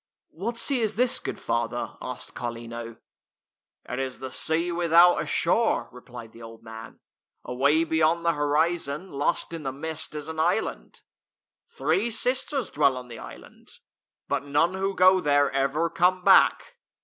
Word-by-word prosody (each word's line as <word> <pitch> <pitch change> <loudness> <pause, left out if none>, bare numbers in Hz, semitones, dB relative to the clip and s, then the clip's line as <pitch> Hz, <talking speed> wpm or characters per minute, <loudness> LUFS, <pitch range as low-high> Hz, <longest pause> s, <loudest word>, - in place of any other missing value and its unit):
"What 225 +8 -4
sea 255 +2 +1
is 220 -1 0
this, 250 +2 +2
good - - -6
father?" 115 0 -2
asked - - -7
Carlino. 115 -1 -6 0.9
"It 125 - -4
is 130 -1 -3
the 130 -1 -7
sea 165 +5 -1
without 170 0 +5
a 150 - -5
shore," 170 - +1
replied 120 -2 -11
the 115 - -15
old 115 0 -12
man. 110 0 -10 0.2
" - - -56
Away 140 +6 +2
beyond 160 +1 +1
the 170 - +3
horizon, 150 +3 -1
lost 145 +4 -1
in 165 - -5
the 135 -3 -3
mist, 160 +3 -6
is 150 0 -6
an 160 0 -6
island. 175 +7 -1 0.7
Three 350 - 0
sisters 255 +3 -1
dwell 140 -3 +2
on 125 -1 -9
the 115 - -9
island. - - -13 0.5
But - - -1
none 145 +5 +1
who 195 +1 -2
go 185 0 +5
there 145 -2 +2
ever 140 +4 0
come 180 +2 +1
back." 485 - +4
160 Hz, 160 wpm, -26 LUFS, 130-180 Hz, 0.9 s, without